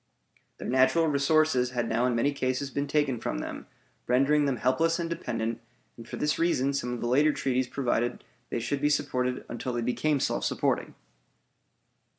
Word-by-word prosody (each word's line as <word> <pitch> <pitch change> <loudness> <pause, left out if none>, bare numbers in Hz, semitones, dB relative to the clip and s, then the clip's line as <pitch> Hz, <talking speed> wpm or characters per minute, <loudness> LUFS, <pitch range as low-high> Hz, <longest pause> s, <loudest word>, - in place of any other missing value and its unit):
Their - - -6
natural 130 +6 +3
resources 145 -3 +2
had 120 -1 +1
now 115 +3 +1
in 125 - 0
many 130 +5 +2
cases 130 0 -2
been 140 +1 -2
taken 140 -4 +1
from - - -3
them, - - -6 0.4
rendering 140 +4 +3
them 135 -3 0
helpless 160 +8 +2
and 170 -1 -2
dependent, 115 -8 -3 0.3
and 115 0 -12
for - - -5
this 150 0 0
reason 140 -5 +2
some 125 -3 -2
of 120 - -4
the 120 - -1
later 145 +5 +4
treaties 130 -3 0
provided 120 -3 0
that - - -17 0.3
they - - -2
should 135 +4 -2
be 150 - +3
supported 125 -3 -1
until 125 - -4
they 120 - -1
became 140 +4 +1
self - - -1
supporting. - - -1
130 Hz, 180 wpm, -28 LUFS, 125-145 Hz, 0.4 s, later